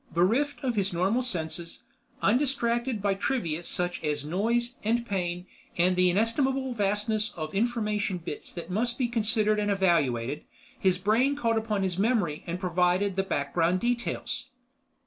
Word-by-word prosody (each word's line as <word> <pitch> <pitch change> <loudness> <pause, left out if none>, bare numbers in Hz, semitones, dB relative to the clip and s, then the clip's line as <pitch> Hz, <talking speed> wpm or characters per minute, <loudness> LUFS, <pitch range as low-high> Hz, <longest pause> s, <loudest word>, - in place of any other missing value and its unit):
Bereft 245 - +2
of 250 -3 0
his 195 -2 +1
normal 190 +8 +2
senses, 170 -7 -4 0.4
undistracted 240 -1 +1
by 200 -1 +3
trivia 190 -6 -1
such 175 0 -2
as 150 -1 -1
noise 235 +9 0
and 235 +2 +1
pain 180 -4 -2 0.3
and 180 +1 +3
the 180 0 +4
inestimable 260 +6 +1
vastness 210 0 0
of 155 -2 -5
information 210 -3 0
bits 165 -3 -7
that 170 0 -7
must 235 +5 0
be 255 -3 +1
considered 215 -2 +2
and 205 0 0
evaluated, 150 - +1 0.4
his 185 -1 +2
brain 225 +9 +2
called 230 -5 +1
upon 215 -3 0
his 185 -1 -1
memory 205 -9 +1
and 175 +1 -3
provided 180 +2 +1
the 195 - +2
background 170 +1 0
details. 240 +2 -2
200 Hz, 145 wpm, -28 LUFS, 180-235 Hz, 0.4 s, the